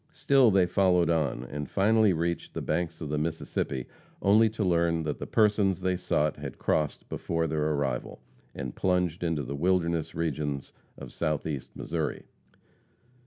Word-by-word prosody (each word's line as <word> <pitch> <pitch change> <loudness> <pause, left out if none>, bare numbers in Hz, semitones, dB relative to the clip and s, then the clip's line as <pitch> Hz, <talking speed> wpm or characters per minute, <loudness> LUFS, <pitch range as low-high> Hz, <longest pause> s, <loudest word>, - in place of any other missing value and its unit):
Still 135 -4 +4
they 95 -3 +4
followed 90 -2 +3
on, 80 -6 0
and 70 +2 -6
finally 110 +1 +4
reached 85 0 -2
the - - -2
banks 85 -1 -2
of 75 - -4
the 75 0 0
Mississippi 75 -5 -2 0.3
only 110 +3 +5
to 110 0 -3
learn 85 -2 +2
that 75 -2 -3
the - - -5
persons 105 -4 +3
they 95 0 +1
sought 75 -4 0
had - - -7
crossed 75 -2 -1
before 85 0 -2
their 75 -1 0
arrival, 65 -4 -2 0.4
and 65 -3 -5
plunged 90 -2 0
into 80 -4 0
the 70 - -5
wilderness 85 0 0
regions 75 -3 -2 0.2
of - - -10
Southeast 75 -3 -2
Missouri. - - -3
85 Hz, 155 wpm, -28 LUFS, 75-95 Hz, 0.4 s, only